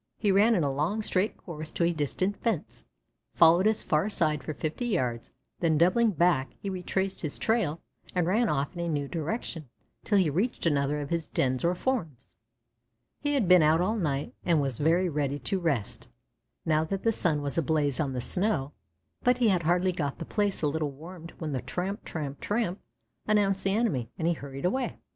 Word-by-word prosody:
He 205 - +2
ran 210 +4 +5
in 175 - +2
a 140 -1 0
long, 170 +10 -1
straight 195 +1 0
course 155 -3 -7
to - - 0
a 170 +1 +2
distant 170 +6 -1
fence, 225 -9 -3 0.5
followed 170 +4 +6
its 220 0 +1
far 155 +7 +1
side 155 -8 0
for 155 - -4
fifty 160 - -3
yards, 125 - -1 0.3
then 160 -3 +2
doubling 185 +8 +4
back 170 - +1
he 200 - -4
retraced 190 +1 -1
his 155 -3 -2
trail 215 -9 0 0.4
and 180 -2 +2
ran 215 +6 +2
off 140 +2 -1
in 175 - -8
a 170 0 -1
new 145 -3 -1
direction 165 - -4 0.3
till 205 - +2
he 185 -4 +4
reached 185 - -1
another 145 -1 +1
of 145 - -6
his 165 -2 -1
dens 130 -1 0
or 175 +1 +2
forms. 170 - -3 0.8
He 290 0 0
had 240 -9 +1
been 180 -1 +7
out 155 +1 +4
all 195 +6 +1
night 145 -8 -2
and 170 -3 +3
was 135 -4 -1
very 170 +5 +3
ready 145 -3 -1
to 145 +9 -2
rest, 145 - -2 0.6
now 155 -1 +2
that 195 +4 -3
the 225 - +3
sun 155 -8 0
was 140 -1 -3
ablaze 145 -3 +1
on 140 -4 0
the 125 - -2
snow; 170 - 0 0.5
but 250 0 +3
he 240 -3 +3
had 185 -3 +2
hardly 175 +3 +2
got 145 -6 -3
the - - -6
place 205 -5 -1
a - - +4
little 150 0 -1
warmed 165 +4 -10
when 155 -3 -4
the 130 -3 -2
"tramp, 190 +3 -4
tramp, 145 -3 -5
tramp" 210 -3 -1 0.5
announced 200 -3 +2
the 195 +1 +2
enemy, 165 - 0
and 165 - -1
he 170 - +3
hurried 140 -2 -7
away. 255 +8 -1
170 Hz, 200 wpm, -28 LUFS, 145-195 Hz, 0.8 s, been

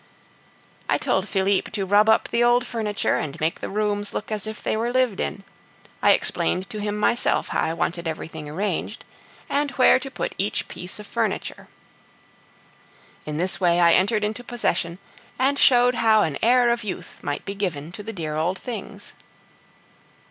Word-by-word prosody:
I - - +3
told - - 0
Philippe 195 0 +1
to 200 -2 -1
rub 205 +3 +4
up 220 - +3
the 235 0 +2
old 240 +1 +4
furniture 215 -3 -1
and 145 -2 -4
make 160 +2 -1
the - - -5
rooms 205 0 -1
look 210 - -4
as 215 0 -3
if 220 0 -7
they - - 0
were 230 +2 -1
lived 255 -5 +1
in; 195 - -3 0.6
I - - +6
explained 185 +1 -1
to 215 - -5
him 210 0 -2
myself 235 +3 +1
how - - 0
I 160 - 0
wanted 170 0 -2
everything 160 -1 -6
arranged, 195 +7 -3 0.4
and 290 +1 0
where 255 0 +5
to 270 +1 -6
put - - -4
each 200 +2 -1
piece 180 +1 -7
of 210 - -9
furniture. - - -3 1.6
In 150 0 -3
this 185 +3 -2
way 175 -1 +3
I 170 -1 +6
entered 210 +3 +2
into 215 +4 -2
possession, 180 -8 -1 0.4
and 275 +2 +2
showed 245 -1 +5
how 220 -3 +4
an 150 -4 -2
air 240 +1 +4
of 235 -1 -1
youth 185 -4 -6
might 145 - -4
be 200 - -4
given 170 -6 -3
to 210 - -8
the 220 - -6
dear 160 -7 -4
old 170 +5 0
things. 210 -3 -8
205 Hz, 175 wpm, -24 LUFS, 175-230 Hz, 1.6 s, I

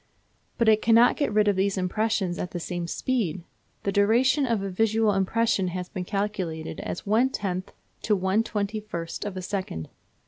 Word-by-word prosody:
But 230 - +2
it 215 -1 +5
cannot 230 +2 +5
get 285 - 0
rid 210 0 +3
of 205 - +3
these 195 +1 +1
impressions 190 -1 0
at 180 - -3
the 175 - -5
same 175 0 -4
speed. 190 -5 -1 0.4
The 200 - 0
duration 245 +8 +3
of 225 -4 0
a 195 - -2
visual 220 +2 +2
impression 195 0 +1
has 180 0 -4
been 185 -3 -5
calculated 185 -6 -3
as - - -5
one 225 +6 +3
tenth 185 -6 -3 0.3
to 210 - +2
one 190 +3 +2
twenty 215 -1 -2
first 170 -4 -6
of 200 -2 -4
a 185 - -4
second. 185 - -4
200 Hz, 180 wpm, -26 LUFS, 185-220 Hz, 0.4 s, it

